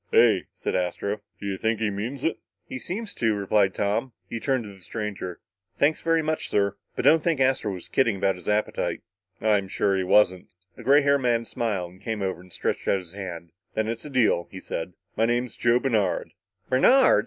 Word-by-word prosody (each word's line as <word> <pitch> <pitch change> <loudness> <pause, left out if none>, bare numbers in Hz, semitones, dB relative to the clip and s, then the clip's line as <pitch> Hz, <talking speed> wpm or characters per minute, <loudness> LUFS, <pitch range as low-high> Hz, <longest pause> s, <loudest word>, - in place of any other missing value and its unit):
"Hey," - - +5
said - - -4
Astro, 95 +3 -1 0.2
"do - - -7
you 95 -1 -2
think 110 -1 0
he 110 -2 0
means 115 +7 -4
it?" 165 - 0 0.3
"He 130 - -5
seems 205 - -4
to," 115 -2 +1
replied 100 -1 +2
Tom. 110 +5 0
He 115 - -4
turned 130 0 0
to 105 -2 -9
the 95 - -16
stranger. 100 -2 -5 0.4
"Thanks 150 +2 +2
very 165 -1 +2
much, 155 0 -2
sir, 100 -1 +1 0.2
but - - -2
don't 155 +3 +6
think 165 -4 +1
Astro 130 -5 +2
was 90 -2 -6
just - - -13
kidding 120 -6 +3
about 95 0 +1
his 90 +1 -7
appetite." 105 +1 0 0.4
"I'm 105 -3 +2
sure 100 +1 +1
he 95 - +1
wasn't." 95 -1 +3 0.3
The - - -11
gray 140 +2 +5
haired 140 0 +3
man 120 -2 +1
smiled, 105 -8 -2
and 95 - -18
came 110 -3 -3
over 95 -2 -2
and 90 0 -17
stretched - - -2
out - - +4
his 90 -2 -9
hand. 85 -4 -7 0.2
"Then 110 0 0
it's 115 0 -3
a 150 - -7
deal," 120 -10 +2
he 95 - -8
said. 90 0 -5 0.2
"My 115 +1 +2
name's 120 +1 0
Joe 120 0 +3
Bernard." 110 -8 0 0.4
"Bernard!" 250 - +5
110 Hz, 210 wpm, -26 LUFS, 95-130 Hz, 0.4 s, don't